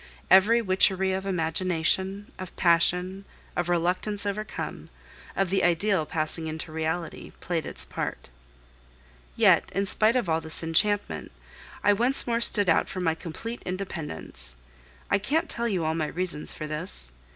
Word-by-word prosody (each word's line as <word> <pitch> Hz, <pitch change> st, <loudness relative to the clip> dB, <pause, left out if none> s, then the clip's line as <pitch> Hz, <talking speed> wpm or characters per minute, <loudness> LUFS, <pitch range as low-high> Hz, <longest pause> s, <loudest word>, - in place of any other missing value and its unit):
Every 225 Hz, +5 st, +6 dB
witchery 190 Hz, -1 st, +3 dB
of 190 Hz, +1 st, -3 dB
imagination, 185 Hz, +3 st, 0 dB
of 185 Hz, -1 st, -8 dB
passion, 180 Hz, +3 st, +3 dB, 0.3 s
of 175 Hz, 0 st, -1 dB
reluctance 180 Hz, +4 st, 0 dB
overcome, 210 Hz, +1 st, -4 dB, 0.5 s
of 195 Hz, -2 st, 0 dB
the 195 Hz, -, +2 dB
ideal 175 Hz, -1 st, +2 dB
passing 160 Hz, +1 st, -1 dB
into 160 Hz, +1 st, -5 dB
reality, 160 Hz, +1 st, -3 dB
played 170 Hz, -2 st, -2 dB
its -, -, -1 dB
part. -, -, -5 dB, 1.1 s
Yet, -, -, +4 dB
in 195 Hz, +1 st, +1 dB
spite 215 Hz, +4 st, +3 dB
of 245 Hz, -7 st, +1 dB
all 160 Hz, 0 st, +1 dB
this 160 Hz, +1 st, +1 dB
enchantment, 205 Hz, +6 st, 0 dB, 0.5 s
I 205 Hz, -, +5 dB
once 245 Hz, +6 st, +2 dB
more 235 Hz, -1 st, 0 dB
stood 205 Hz, -4 st, +3 dB
out 165 Hz, -, +3 dB
for 185 Hz, -, -5 dB
my 165 Hz, -3 st, +1 dB
complete 180 Hz, +9 st, -7 dB
independence. 175 Hz, -, -5 dB, 0.6 s
I -, -, +4 dB
can't 290 Hz, +11 st, 0 dB
tell 235 Hz, 0 st, -1 dB
you 185 Hz, -7 st, -1 dB
all 160 Hz, -, +1 dB
my 160 Hz, -2 st, -1 dB
reasons 175 Hz, -3 st, -1 dB
for 155 Hz, -, -6 dB
this. 150 Hz, -, -4 dB
185 Hz, 150 wpm, -27 LUFS, 165-200 Hz, 1.1 s, Every